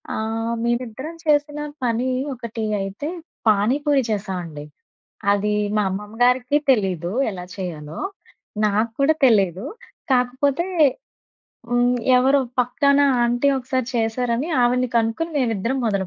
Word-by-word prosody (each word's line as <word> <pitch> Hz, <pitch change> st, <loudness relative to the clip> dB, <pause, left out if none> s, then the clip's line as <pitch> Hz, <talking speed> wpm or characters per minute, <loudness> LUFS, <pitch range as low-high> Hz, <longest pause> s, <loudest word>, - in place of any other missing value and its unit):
ఆహ్, 225 Hz, +1 st, -2 dB
మేమిద్దరం 245 Hz, +6 st, -3 dB
చేసిన 295 Hz, -1 st, +2 dB, 0.3 s
పని 240 Hz, +2 st, 0 dB, 0.2 s
ఒకటి 230 Hz, -3 st, -5 dB, 0.2 s
అయితే 195 Hz, +10 st, -4 dB, 0.4 s
పాని 215 Hz, +5 st, +3 dB
పూరి 280 Hz, -3 st, +3 dB
చేశామండి. 180 Hz, -7 st, -4 dB, 0.7 s
అది 205 Hz, +1 st, +1 dB, 0.2 s
మా 210 Hz, -, +3 dB
అమ్మమ్మ 205 Hz, +3 st, -6 dB
గారికి 250 Hz, +3 st, +3 dB
తెలీదు 185 Hz, -8 st, +1 dB, 0.2 s
ఎలా 180 Hz, -3 st, -7 dB
చేయాలో? 160 Hz, -5 st, -6 dB, 0.7 s
నాకూడా 225 Hz, +8 st, +2 dB
తెలియదు. 195 Hz, -5 st, +3 dB, 0.5 s
కాకపోతే, 260 Hz, +6 st, +1 dB, 1.0 s
హ్మ్. 245 Hz, 0 st, +3 dB, 0.2 s
ఎవరో 270 Hz, +2 st, +4 dB, 0.2 s
పక్కన 280 Hz, +3 st, +2 dB, 0.2 s
ఆంటీ 240 Hz, +3 st, +2 dB
ఒకసారి 255 Hz, -1 st, -2 dB
చేశారని 235 Hz, +4 st, 0 dB
ఆవిడ్ని 250 Hz, +1 st, +2 dB
కనుక్కొని 230 Hz, +9 st, 0 dB
మేమిద్దరం 235 Hz, 0 st, 0 dB
మొదలు 200 Hz, -3 st, 0 dB
235 Hz, 110 wpm, -22 LUFS, 205-260 Hz, 1.0 s, ఎవరో